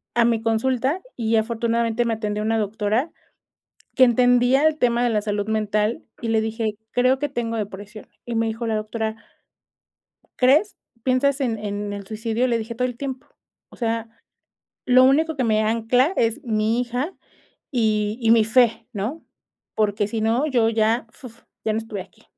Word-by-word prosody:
a 235 -1 +4
mi 230 -1 +1
consulta, 260 +8 0
y 225 -1 0
afortunadamente 230 +1 0
me 230 - 0
atendió 210 -1 -3
una 225 +1 +1
doctora 220 - -1 0.8
que 260 - +7
entendía 245 +3 +4
el 310 -1 +2
tema 240 -2 +2
de 240 - +2
la 215 -2 +1
salud 205 0 -2
mental 215 +1 0 0.2
y 230 - -4
le 225 -1 +2
dije: 220 -1 -2 0.2
"Creo 255 +2 +3
que 290 +2 -1
tengo 235 -4 -3
depresión". 205 0 -7 0.2
Y 240 - -5
me 225 0 +1
dijo 225 +1 -3
la 220 -1 0
doctora 220 +1 -3 1.2
"¿Crees? 285 +11 +3 0.3
¿Piensas 270 +2 +1
en 235 -4 0
en 205 0 -4
el 200 -1 -7
suicidio?" 225 +3 -1
Le 235 -2 +1
dije: 225 +1 -6
"Todo 250 +2 0
el 245 -2 -7
tiempo. 265 -2 -6 0.4
O - - -15
sea, 230 -1 -2 0.8
lo 255 0 +6
único 310 +4 +3
que 260 - 0
me 215 -1 +2
ancla 230 - +2
es 230 +4 +1
mi 220 0 +1
hija 250 +7 -2 0.6
y 215 -3 0
y 225 - +3
mi 225 -2 +5
fé, 225 0 +3
¿no? 230 +9 -4 0.5
Porque, 210 -1 +1
si 225 +1 -3
no, 230 +6 +2
yo 240 -6 +2
ya, 225 +1 +1
fuf, 235 -2 -13 0.2
ya 220 - +1
no 215 - 0
estuviera 220 -4 -6
aquí" - - -26
230 Hz, 175 wpm, -22 LUFS, 220-250 Hz, 1.2 s, que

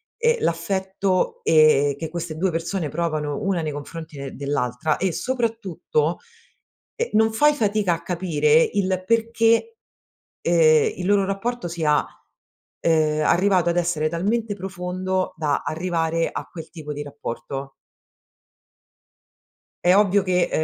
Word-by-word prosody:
ehm, 470 +1 +2
l'affetto, 190 +2 -1
ehm, 145 -3 +4
che 160 - -4
queste 165 -1 -5
2 185 +2 +1
persone 165 0 -2
provano 155 +2 -2
una 195 -4 0
nei 155 -2 -3
confronti 160 +2 -8
de 140 -1 -7
dell'altra 140 +1 -1
e 185 -1 -1
soprattutto, 195 - -1 0.8
ehm, 475 0 -2
non 220 +1 +3
fai 295 +6 +4
fatica 210 -7 +1
a 165 - -10
capire 160 -3 +2
il 185 -2 0
perché, 230 - +2 0.6
ehm, 155 -3 +4
il 180 - -5
loro 200 0 +3
rapporto 195 +2 -3
sia, 160 -3 +1 0.8
uhm, 155 -2 +2
arrivato 185 0 +3
ad 170 - 0
essere 170 -3 +1
talmente 205 +6 -1
profondo, 185 0 -3
da 150 -3 0
arrivare 165 0 -1
a - - -5
quel 165 -2 -9
tipo 150 -3 -7
di 145 0 -5
rapporto. 135 -1 -6 2.1
È 180 +1 +5
ovvio 200 -1 +4
che, 180 -1 +1
175 Hz, 130 wpm, -23 LUFS, 155-195 Hz, 2.1 s, È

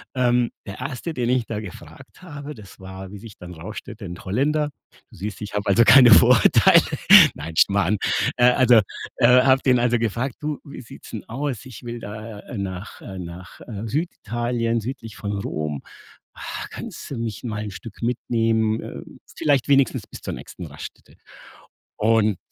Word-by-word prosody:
Ähm, 125 -1 +2 0.2
der 100 - -7
1. 135 +6 -5
den 120 -4 -1
ich 125 -2 +1
da 105 -2 -4
gefragt 100 -6 -12
habe, 145 -4 -8
das 105 -4 -14
war, 95 0 -9
wie - - -7
sich 105 0 -12
dann 90 0 -10
rausstellte, 105 +5 -9
'n 85 0 -7
Holländer. 145 +9 0 0.4
Du - - -15
siehst, 105 +4 -6
ich 105 - -7
habe 105 - -2
also 110 +4 +5
keine 125 0 +8
Vorurteile. - - +7 0.5
Nein, 80 +2 -7
Schmarrn. 100 +3 +3 0.4
Äh, 125 0 +5
also 125 -3 +5 0.4
äh, 125 +2 +6
habe 135 0 +4
den 125 -2 +4
also 120 0 +2
gefragt: 115 +3 -2
„Du, 150 -1 -3
wie 140 - -9
sieht's 115 - -13
'n 110 - -5
aus? 135 0 -4
Ich 125 -4 -11
will 120 0 -6
da, 105 0 -8
äh, 120 - -9
nach, 95 0 -6
äh 95 -1 -8
nach, 90 +1 -10
äh, 110 -1 -7
Süditalien, 120 -4 -2
südlich 115 -2 -7
von 100 - -4
Rom. 75 -6 -4 0.6
Ha, - - -6
kannst - - -8
du 135 - -4
mich 115 -3 -5
mal 110 -3 -4
'n 105 - -6
Stück 105 +3 -11
mitnehmen, 115 -2 0
äh, - - -8 0.4
vielleicht 140 -4 +2
wenigstens 140 -3 +2
bis - - -11
zur - - -5
nächsten - - -9
Raststätte?“ - - -11 0.8
Und 110 -3 +2
115 Hz, 175 wpm, -23 LUFS, 100-125 Hz, 0.8 s, keine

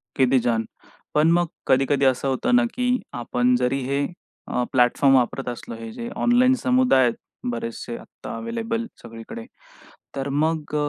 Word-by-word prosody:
किती 130 0 +4
छान! 115 -2 0 0.5
पण 150 +2 +4
मग 175 +1 +3 0.2
कधी-कधी 135 +1 +3
असं 130 +1 +2
होतं 135 - +1
ना 245 - +5
की 250 0 0 0.2
आपण 125 +1 +1
जरी 125 +2 +1
हे 140 +2 0 0.4
अ, 125 - 0
प्लॅटफॉर्म 130 +2 +4
वापरत 130 +1 +1
असलो 120 -1 -7
हे 115 0 -8
जे 235 - -6
ऑनलाईन 250 +2 +4
समुदाय 250 - +4
आहेत 120 -2 +2 0.4
बरेचसे 115 0 -5
आत्ता - - -9
अवेलेबल 230 0 -3 0.2
सगळीकडे. 115 - -9 0.7
तर 135 0 -2
मग 150 +2 -1
135 Hz, 150 wpm, -23 LUFS, -, 0.7 s, ना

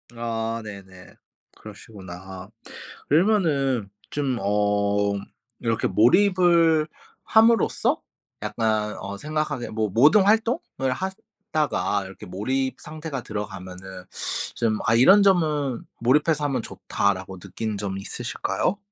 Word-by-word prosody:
아 115 -1 -3
네네. 95 -4 -11 0.4
그러시구나. 95 -3 -10 0.6
그러면은 145 - +2 0.2
좀 135 -4 -1
어 100 0 +1 0.5
이렇게 115 -1 0
몰입을 165 - +4 0.4
함으로써 225 +1 +3 0.4
약간 110 -1 -1
어 100 +1 -6
생각하게 150 -1 -3
뭐 110 -1 -1
모든 150 - +5
활동을 220 - +1
하다가 190 - -2
이렇게 95 +2 -10
몰입 130 +8 -2
상태가 155 -4 -6
들어가면은 95 -3 -7 0.5
좀 110 -2 0
'아 115 - +3
이런 190 - +7
점은 150 -9 +2 0.2
몰입해서 150 +5 +2
하면 135 -3 0
좋다.'라고 95 -2 -2
느낀 105 +3 -5
점 100 -1 -3
있으실까요? 110 - -2
115 Hz, 245 characters per minute, -24 LUFS, 100-155 Hz, 0.6 s, 이런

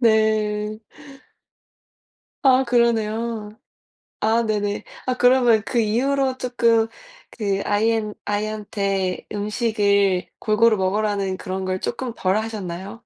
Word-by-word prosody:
네. 215 -2 +2 1.6
아. 265 -1 +5
그러네요. 225 -2 0 0.6
아. 225 +2 +2
네네. 205 -1 -1 0.2
아 255 - +1
그러면 245 -3 +4
그 240 - -1
이후로 260 +4 +1
쪼끔 235 -3 +2 0.4
그 200 -3 -2
아이엔 215 0 +1
아이한테 205 -3 -2
음식을 205 -3 +1
골고루 220 +1 +3
먹으라는 195 0 0
그런 190 +1 -4
걸 185 0 -2
쪼끔 240 0 -4
덜 185 +1 +1
하셨나요? 200 -3 -5
215 Hz, 215 characters per minute, -22 LUFS, 205-230 Hz, 1.6 s, 아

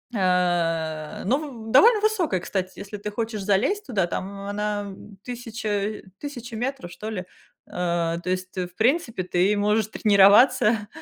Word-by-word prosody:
э, 170 -5 0
но 250 +8 +2
в 240 -8 -7
довольно 425 - +6
высокая, 365 - +1
кстати, 185 +1 -4
если 205 +1 -7
ты 210 +1 -5
хочешь 220 0 -3
залезть 230 - +1
туда, 195 -8 0
там 195 +3 -5
она 205 +1 -2
м 195 0 -11
1000, 220 -4 -3 0.2
1000- 245 -5 -7
метров, 240 -7 -4
что 215 - -7
ли. 185 -4 -4 0.4
Э, 170 -1 -1
то 180 - -4
есть, 185 0 -3
э, 180 -1 -1
в 180 - -23
принципе, 235 - +1
ты 185 +3 +2
можешь 210 +1 +2
тренироваться, 210 +1 +5
205 Hz, 155 wpm, -24 LUFS, 185-230 Hz, 0.4 s, довольно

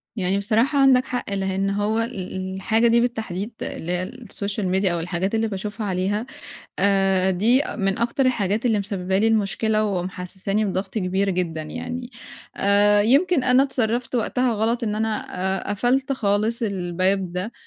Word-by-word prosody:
يعني 195 -2 0
بصراحة 230 +8 +2
عندك 265 -2 +5
حق 245 -6 -4
لإن 195 0 -1
هو 205 +3 0
ال 190 -5 -4
الحاجة 220 +4 +2
دي 235 +1 +4
بالتحديد، 220 -4 -3
اللي 170 - -4
هي 185 +4 -2
الSocial 210 -4 -4
media 190 +1 +1
أو 170 - -1
الحاجات 180 +5 -2
اللي 225 0 +1
باشوفها 210 +2 -4
عليها، 195 +4 -1 0.5
آآ 195 -1 +3
دي 230 +9 +3
أ - - -5
من 195 -2 0
أكتر 240 +3 +1
الحاجات 220 -2 0
اللي 220 -3 +2
مسببة 190 -2 -1
لي 215 - +3
المشكلة 215 0 +1
ومحسّساني 190 +2 -2
بضغط 190 -1 -3
كبير 195 -1 0
جدًا 170 -4 -2
يعني، 245 +10 -6 0.5
آآ 205 +1 +4
يمكن 280 - +3
أنا 255 +1 +5
اتصرّفت 245 -2 -1
وقتها 250 +1 +1
غلط 230 +3 0
إن 210 - -1
أنا 220 0 -1 0.4
آآ - - -2
قَفَلت 260 +6 +1
خالص 220 0 0
الباب 185 -2 0
ده، 185 +6 -4
205 Hz, 160 wpm, -23 LUFS, 190-235 Hz, 0.5 s, عندك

